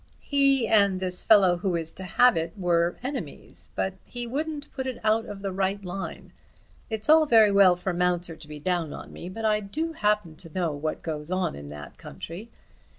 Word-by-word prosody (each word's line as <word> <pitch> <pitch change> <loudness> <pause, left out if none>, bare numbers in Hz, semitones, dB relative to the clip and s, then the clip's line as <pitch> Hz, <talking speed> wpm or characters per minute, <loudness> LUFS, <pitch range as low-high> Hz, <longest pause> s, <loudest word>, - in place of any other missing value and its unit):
He 275 -4 +3
and 200 -4 +4
this 185 -1 +1
fellow 190 -5 +5
who 180 0 -1
is 165 -1 -2
to 190 - -9
have 235 +6 +4
it, 165 0 -2
were 175 -2 +1
enemies, 250 - -6
but 190 - -1
he 240 -1 -6
wouldn't 295 +4 -4
put 265 -1 -4
it 255 - -4
out 220 +1 +2
of 200 -1 -8
the 195 - -2
right 195 +1 -1
line. 190 +2 -6 0.6
It's 220 -1 -3
all 315 0 +6
very 220 -5 +6
well 195 -2 +6
for 180 +1 -3
Mounser 175 -1 0
to 160 - -13
be 150 0 -8
down 170 -1 -1
on - - -9
me, 175 - -8
but 225 +4 -5
I 215 -1 +3
do 300 +12 -3
happen 210 - 0
to 165 - -10
know 175 -4 0
what 150 +2 -4
goes 150 -1 -5
on 185 - -1
in 70 0 -9
that 75 0 -10
country. 190 +8 -9
190 Hz, 205 wpm, -26 LUFS, 175-225 Hz, 0.6 s, all